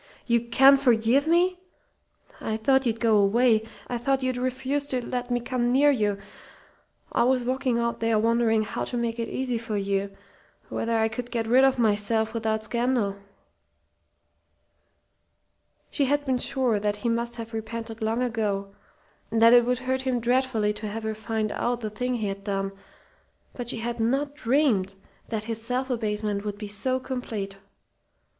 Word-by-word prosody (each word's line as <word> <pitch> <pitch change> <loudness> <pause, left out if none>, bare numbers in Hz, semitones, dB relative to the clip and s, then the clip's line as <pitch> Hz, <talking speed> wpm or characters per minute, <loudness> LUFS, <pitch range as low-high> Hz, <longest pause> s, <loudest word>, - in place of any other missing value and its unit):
"You 235 -1 +2
can 270 +4 +6
forgive 250 +2 +3
me? 355 +2 +3 0.8
I 220 - -2
thought 265 +3 +2
you'd 225 -1 -1
go 225 -2 +4
away. 220 +3 +4 0.3
I 245 - -3
thought 270 +2 0
you'd 255 -1 0
refuse 260 +3 -2
to 250 -3 -2
let 245 0 -3
me 245 0 +1
come 240 0 -1
near 285 +3 +5
you. 210 -6 0 0.9
I - - +1
was 250 0 +2
walking 255 -1 0
out 235 0 -1
there 225 -1 +2
wondering 225 0 +2
how 210 - -4
to 245 - -4
make 235 0 -2
it 230 - -2
easy 250 -3 -2
for 225 -2 -3
you 200 0 -1 0.6
whether 230 0 -1
I 220 0 +3
could 240 +2 -5
get 230 -2 -2
rid 250 +4 +5
of 270 -1 +4
myself 220 0 +1
without 220 -1 -1
scandal." 235 -3 0 2.7
She 285 - +1
had 290 +2 +1
been 260 -2 +1
sure 245 -5 +1
that 205 0 0
he 210 +3 -4
must 235 +1 -1
have 230 -1 -7
repented 225 +1 -6
long 225 +3 0
ago, 205 -5 -2 0.6
and 225 - 0
that 230 +1 +7
it 240 -1 +7
would 250 +1 +1
hurt 260 0 0
him 260 -2 0
dreadfully 240 -3 +1
to 210 +1 -6
have 220 +2 -5
her 220 0 -2
find 220 0 -2
out 240 0 -1
the 215 -2 -4
thing 250 +4 -2
he 220 -3 -2
had 195 0 -5
done, 195 -1 -2 0.8
but 245 -2 -5
she - - -1
had 235 +1 -4
not 270 +6 0
dreamed 235 -8 +1 0.3
that 220 -2 -2
his 225 0 -5
self 250 +3 -2
abasement 210 -3 -2
would 205 -1 -4
be 210 0 -6
so 255 +6 -1
complete. 225 -7 -5
235 Hz, 175 wpm, -26 LUFS, 220-255 Hz, 2.7 s, that